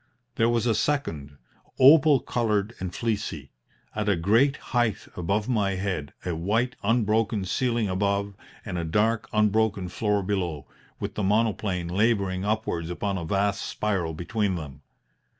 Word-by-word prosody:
There 115 +1 +2
was 120 -1 +1
a 115 - +3
second 80 - -2 0.4
opal 140 0 +7
coloured 110 -2 0
and 95 -1 -4
fleecy 100 - -3 0.4
at 105 0 -1
a 100 - +3
great 115 +11 +3 0.2
height 120 -5 +1
above 100 +5 -1
my 105 -6 +1
head, 90 -6 -3
a 90 -2 -1
white 110 +9 0
unbroken 110 -2 +1
ceiling 120 +2 0
above, 100 +1 0 0.3
and 90 - -3
a - - -2
dark 110 +8 +1
unbroken 105 -3 +1
floor 105 +1 0
below, 90 -7 -2 0.3
with - - -4
the - - -3
monoplane 100 -3 0
labouring 95 -1 +1
upwards 105 -6 -1
upon 95 +2 -2
a 85 - -5
vast 100 +4 0
spiral 95 -7 -2
between 100 +3 -1
them. 70 -4 -8
100 Hz, 145 wpm, -26 LUFS, 90-115 Hz, 0.4 s, opal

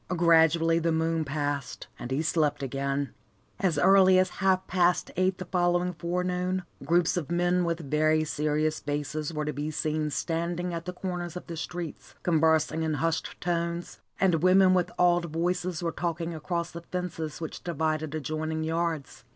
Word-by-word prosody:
Gradually 165 0 +4
the 165 0 +1
moon 160 0 +1
passed, 145 -2 -3
and 120 - -6
he 135 +4 0
slept 150 -3 +1
again. 140 +1 -2 0.5
As 180 -6 +1
early 190 +3 +6
as 185 0 +3
half 190 -1 +3
past 175 -1 +2
eight 185 +1 +1
the 185 - -6
following 175 0 +1
forenoon, 180 +2 -1 0.2
groups 170 +4 +2
of 160 -4 -3
men 175 +1 +2
with 170 0 -1
very 155 +1 +3
serious 155 +1 0
faces 145 +2 -3
were 150 -2 -3
to 150 - -2
be 145 +3 -3
seen 155 0 -1
standing 170 +3 -2
at 165 0 -4
the 180 - -4
corners 180 -2 -4
of - - -8
the 170 - -6
streets, 170 0 -6
conversing 160 -1 +2
in 160 -1 0
hushed 160 +2 -2
tones, 170 0 -2 0.2
and 175 -5 +3
women 185 +1 +6
with 180 -1 +1
awed 175 -1 +4
voices 175 +1 -2
were 165 - 0
talking 170 0 -3
across 170 +2 -3
the 170 - -7
fences 170 -3 -4
which 160 -2 -6
divided 155 -2 -1
adjoining 155 +1 -2
yards. 160 -3 -2
165 Hz, 165 wpm, -28 LUFS, 155-175 Hz, 0.5 s, early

